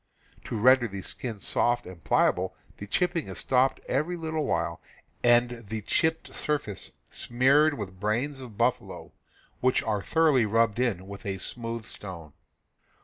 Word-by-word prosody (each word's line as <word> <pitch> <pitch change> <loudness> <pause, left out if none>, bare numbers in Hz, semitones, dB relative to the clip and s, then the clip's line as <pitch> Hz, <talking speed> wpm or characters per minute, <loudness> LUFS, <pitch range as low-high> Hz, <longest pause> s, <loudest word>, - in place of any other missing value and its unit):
To 115 - -3
ren 130 +5 +6
der 120 - -2
the 100 -2 -7
skin 115 -5 -4
soft 120 +4 +1
and 90 -3 -11
pliable - - +2 0.2
the 100 - -8
chipping 175 - 0
is 95 - -5
stopped 130 +1 +2
every 155 +7 0
little 160 -2 -2
while 85 0 -1 0.4
and 120 0 +3
the 110 +1 -4
chipped 160 +9 0
surface 145 - -2 0.2
smeared 140 +5 +3
with 95 -5 -7
brains 120 +8 -1
of 120 -6 -10
buffalo, 120 +2 -1 0.5
which 130 0 +2
are 105 -2 -1
thoroughly 150 -5 +3
rubbed 115 +1 +2
in 100 -7 0
with 100 0 -9
a 95 -1 -2
smoothe 115 +3 -5
stone. 90 -8 -9
120 Hz, 150 wpm, -27 LUFS, 100-135 Hz, 0.5 s, ren